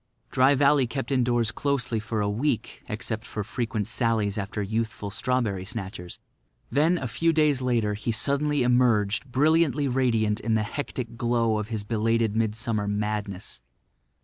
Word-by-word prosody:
Dry 130 +2 +4
Valley 140 -1 +4
kept 135 +3 -4
indoors 120 -3 +2
closely 130 -5 -1
for 110 0 -3
a 100 - 0
week 115 +2 -2
except 110 +1 -3
for 105 -2 -5
frequent 115 -2 -2
sallies 110 -4 0
after 105 0 -3
youthful 110 -1 -3
strawberry 115 -4 -1
snatchers. 95 -4 -6 0.5
Then, 160 +5 +3
a 130 - -3
few 165 +8 +1
days 150 -4 +2
later, 115 -5 +1
he 105 +3 -2
suddenly 140 +4 +2
emerged 120 -1 +2
brilliantly 150 +1 +3
radiant 115 -5 +1
in 110 0 0
the 110 - +1
hectic 120 -1 -5
glow 115 -2 +1
of 105 - -4
his 110 -3 -3
belated 115 0 0
midsummer 110 -1 -1
madness. 105 - -3
115 Hz, 150 wpm, -26 LUFS, 105-130 Hz, 0.5 s, Dry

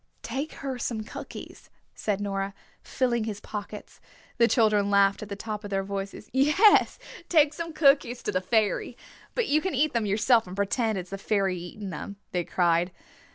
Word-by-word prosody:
"Take 270 +6 -4
her 260 -2 -3
some 230 -2 -2
cookies," - - -9 0.2
said 205 -2 -2
Nora, 195 -1 -3 0.3
filling 240 -3 0
his 210 -2 -4
pockets. 210 0 -8 0.4
The 235 - +6
children 215 -4 +3
laughed 200 0 +4
at 210 - -7
the 200 - -4
top 210 +1 -5
of 205 - -6
their 195 -1 0
voices. 195 +1 -5
"Yes, 300 +11 +5 0.3
take 305 -3 +4
some 335 +1 -5
cookies 275 -5 +3
to - - -1
the 185 -2 0
fairy. 215 +3 0 0.4
But 480 -3 +1
you 305 +2 +3
can 375 -3 -2
eat 295 +3 +2
them 230 -3 0
yourself 220 +2 +3
and 180 - -7
pretend 210 +2 0
it - - -1
is 180 - -15
the 195 - -5
fairy 195 -2 +1
eating 190 +3 -7
them," 185 +5 -6 0.2
they 180 -1 0
cried. 175 0 +1
210 Hz, 185 wpm, -27 LUFS, 195-250 Hz, 0.4 s, The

